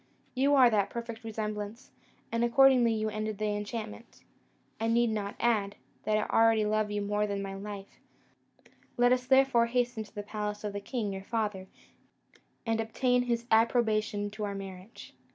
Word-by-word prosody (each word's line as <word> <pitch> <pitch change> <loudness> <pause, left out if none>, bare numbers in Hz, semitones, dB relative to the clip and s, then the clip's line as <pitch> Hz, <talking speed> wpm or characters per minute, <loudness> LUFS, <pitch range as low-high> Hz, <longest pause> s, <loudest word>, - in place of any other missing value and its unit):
You 275 +2 +3
are 255 -3 +6
that 205 -2 +2
perfect 235 0 -6
resemblance; 215 +1 -5 0.4
and 230 0 0
accordingly 250 -1 +5
you 215 -1 -1
ended 215 0 -3
the 215 0 -1
enchantment. 215 +2 -7 0.6
I 225 - 0
need 235 0 +3
not 205 -2 -3
add, 210 -4 +1 0.3
that 215 0 +2
I 215 - +1
already 225 -1 +4
love 215 0 +1
you 205 0 -2
more 210 +1 0
than 200 -1 -2
my 195 0 -5
life; 200 0 -8 1.0
let 245 0 +4
us 250 0 -1
therefore 265 -3 +4
hasten 245 -2 -1
to 215 +1 -19
the 205 - -4
palace 210 0 -4
of 205 -1 -3
the 200 - -4
king 210 -2 -3
your 190 - -5
father, 210 -3 -2 1.0
and 225 -1 0
obtain 245 +3 +1
his 235 -1 -1
approbation 220 -2 +2
to 215 +1 -6
our 200 -1 -3
marriage." 195 +1 -9
215 Hz, 170 wpm, -30 LUFS, 205-235 Hz, 1.0 s, are